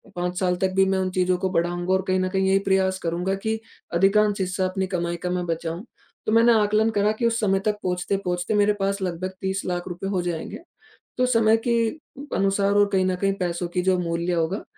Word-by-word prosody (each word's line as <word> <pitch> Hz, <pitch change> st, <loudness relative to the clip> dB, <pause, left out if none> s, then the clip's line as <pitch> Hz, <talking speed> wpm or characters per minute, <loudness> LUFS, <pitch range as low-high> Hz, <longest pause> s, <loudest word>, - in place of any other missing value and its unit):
5 180 Hz, 0 st, -2 dB
साल 180 Hz, -1 st, +1 dB
तक 190 Hz, -, +2 dB
भी 195 Hz, 0 st, +5 dB
मैं 190 Hz, 0 st, +1 dB
उन 185 Hz, -, 0 dB
चीज़ों 185 Hz, 0 st, +1 dB
को 185 Hz, +1 st, -1 dB
बढ़ाऊँगा 175 Hz, +1 st, 0 dB
और 190 Hz, -, +2 dB
कहीं 185 Hz, 0 st, +2 dB
न 185 Hz, 0 st, 0 dB
कहीं 190 Hz, 0 st, 0 dB
यही 195 Hz, 0 st, +4 dB
प्रयास 190 Hz, -1 st, +2 dB
करूँगा 175 Hz, +3 st, -1 dB
कि 220 Hz, 0 st, 0 dB, 0.3 s
अधिकांश 200 Hz, +3 st, +3 dB
हिस्सा 185 Hz, 0 st, -1 dB
अपनी 190 Hz, 0 st, -2 dB
कमाई 175 Hz, -2 st, -2 dB
का 180 Hz, -, -1 dB
मैं 180 Hz, 0 st, -1 dB
बचाऊँ। 165 Hz, +4 st, -4 dB, 0.4 s
तो 215 Hz, -, 0 dB
मैंने 230 Hz, +1 st, +5 dB
आकलन 215 Hz, +2 st, +2 dB
करा 205 Hz, +1 st, +3 dB
कि 235 Hz, -, +1 dB
उस 230 Hz, 0 st, 0 dB
समय 195 Hz, -3 st, +2 dB
तक 210 Hz, -1 st, +1 dB
पहुँचते-पहुँचते 180 Hz, 0 st, -1 dB
मेरे 205 Hz, 0 st, +3 dB
पास 195 Hz, 0 st, -1 dB
लगभग 185 Hz, 0 st, -3 dB
30 190 Hz, +1 st, -1 dB
लाख 175 Hz, 0 st, -3 dB
रुपए 180 Hz, +2 st, -5 dB
हो 190 Hz, -2 st, 0 dB
जाएँगे। 175 Hz, -2 st, -4 dB, 0.6 s
तो 255 Hz, -, +3 dB
समय 225 Hz, -3 st, +4 dB
की 235 Hz, -, +3 dB, 0.6 s
अनुसार 195 Hz, +1 st, +2 dB
और 205 Hz, 0 st, +5 dB
कहीं 185 Hz, -1 st, +3 dB
न 185 Hz, -, +1 dB
कहीं 195 Hz, +2 st, 0 dB
पैसों 175 Hz, -1 st, -2 dB
की 180 Hz, -, +2 dB
जो 185 Hz, 0 st, +2 dB
मूल्य 170 Hz, +1 st, -1 dB
होगा, 170 Hz, +4 st, -1 dB
190 Hz, 220 wpm, -24 LUFS, 180-200 Hz, 0.6 s, भी